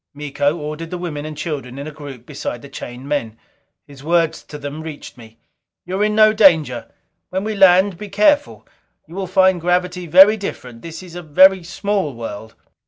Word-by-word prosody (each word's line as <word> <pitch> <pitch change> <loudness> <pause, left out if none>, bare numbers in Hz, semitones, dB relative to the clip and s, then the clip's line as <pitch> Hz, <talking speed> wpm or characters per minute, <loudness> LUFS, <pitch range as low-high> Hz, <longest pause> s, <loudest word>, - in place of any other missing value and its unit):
Miko 145 +1 -1
ordered 155 +1 -6
the 180 - -5
women 155 -4 -5
and 155 -1 -8
children 135 -6 -5
in 140 - -6
a 155 - -7
group 140 -5 -11
beside 120 0 -6
the 140 - -11
chained 125 0 -9
men. 115 -7 -3 0.5
His 140 -1 -15
words 165 0 +1
to 150 - -9
them 145 +2 -7
reached 155 -6 -9
me: 115 -2 -15 0.5
"You 190 +3 -3
are - - +4
in 210 0 +1
no 215 0 +6
danger. 160 - +3 0.4
When 190 +1 -3
we 215 +1 -3
land, 190 -1 +4
be 210 - -8
careful. 285 +10 +1 0.4
You 165 - -15
will 190 0 -4
find 185 -1 +3
gravity 180 +1 -1
very 190 +6 +7
different 125 - -7
this 165 +2 -9
is 180 -2 -12
a 175 - -7
very 185 +4 +5
small 190 - -2
world." 110 -1 -8
165 Hz, 190 wpm, -19 LUFS, 145-190 Hz, 0.5 s, very